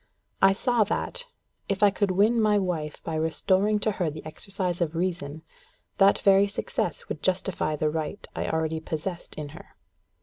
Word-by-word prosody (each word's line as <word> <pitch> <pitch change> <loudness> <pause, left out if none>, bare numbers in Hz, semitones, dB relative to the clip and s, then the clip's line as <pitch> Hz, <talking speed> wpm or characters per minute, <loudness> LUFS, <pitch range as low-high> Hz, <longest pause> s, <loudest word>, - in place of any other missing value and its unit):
I 195 0 +7
saw 240 +2 +2
that, - - -2 0.4
if 195 +1 0
I 205 - +7
could 200 +1 0
win 210 +5 +3
my 210 -1 +4
wife 170 -6 -2
by 165 - -4
restoring 185 +6 +2
to 215 - +1
her 180 -5 -1
the 155 +1 -9
exercise 180 +2 -1
of 165 -1 0
reason, 165 -4 -2 0.6
that 195 0 +6
very 195 0 +5
success 200 - -3
would - - -5
justify 185 -4 0
the 150 0 0
right 160 +6 -4
I - - -2
already 160 0 -1
possessed 165 +3 -5
in 150 -1 -5
her. - - -13
185 Hz, 170 wpm, -26 LUFS, 160-200 Hz, 0.6 s, I